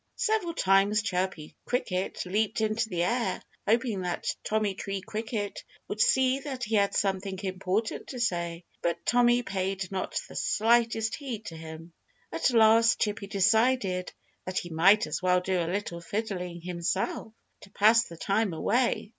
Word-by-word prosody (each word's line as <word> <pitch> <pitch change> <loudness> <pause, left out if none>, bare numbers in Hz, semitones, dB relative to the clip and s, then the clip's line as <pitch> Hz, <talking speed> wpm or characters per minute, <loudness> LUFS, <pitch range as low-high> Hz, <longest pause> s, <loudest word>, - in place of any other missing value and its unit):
Several 435 -8 0
times 195 - +3
Chirpy 180 -6 -3
Cricket 190 -9 -2
leaped 210 +4 0
into 220 +1 0
the 175 -3 0
air, 230 -1 0 0.3
hoping 225 -3 +1
that 180 -1 -2
Tommy 215 -2 0
Tree 195 +1 -4
Cricket 215 0 -4 0.2
would 215 - -2
see 260 +2 +3
that 270 -3 -6
he 225 -1 -4
had 200 -2 +2
something 195 -1 -1
important 190 +3 -2
to 255 - -6
say. 170 -6 -2 0.2
But 170 0 -2
Tommy 245 0 +4
paid 190 -2 -3
not 190 -1 -2
the - - -12
slightest 225 0 +2
heed 240 -7 -5
to 165 - -7
him. 160 +1 -10 0.4
At 165 - +1
last 230 -1 +5
Chirpy 205 -1 -1
decided 200 -1 +2 0.3
that 185 0 -4
he 175 - -3
might 195 +7 +5
as - - -4
well 180 0 +3
do 180 0 0
a 165 - -2
little 180 -3 -3
fiddling 180 -3 -4
himself, 180 +5 -2 0.3
to 200 - -15
pass 225 +4 +4
the 170 - -11
time 200 +1 0
away. 235 +6 0
200 Hz, 155 wpm, -28 LUFS, 180-225 Hz, 0.4 s, last